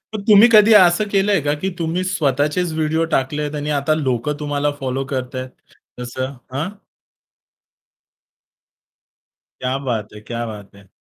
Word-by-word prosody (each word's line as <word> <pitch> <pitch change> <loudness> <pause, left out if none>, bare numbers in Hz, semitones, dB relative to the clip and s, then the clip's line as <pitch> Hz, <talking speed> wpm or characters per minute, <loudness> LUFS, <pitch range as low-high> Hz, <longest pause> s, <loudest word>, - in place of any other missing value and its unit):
मग 210 - -4
तुम्ही 215 +1 +8
कधी 215 0 +7
असं 185 0 +5
केलंय 200 0 +2
का 145 +1 0
की 190 - -1
तुम्ही 170 +2 -1
स्वतःचेच 150 0 0
व्हिडिओ 160 +1 0
टाकलेत 145 +2 -1
आणि 150 0 -4
आता 140 +3 +1
लोकं 145 0 -2
तुम्हाला 145 -1 -1
फॉलो 135 0 -2
करताहेत 130 -1 -4 0.5
तसं 130 +2 -4 0.2
हां? 145 +6 -2 2.9
क्या 130 +1 -1
बात 110 -5 -3
है! 105 - -10
क्या 120 +2 -5
बात 105 -3 -10
है. 100 -1 -18
145 Hz, 135 wpm, -19 LUFS, 130-170 Hz, 2.9 s, तुम्ही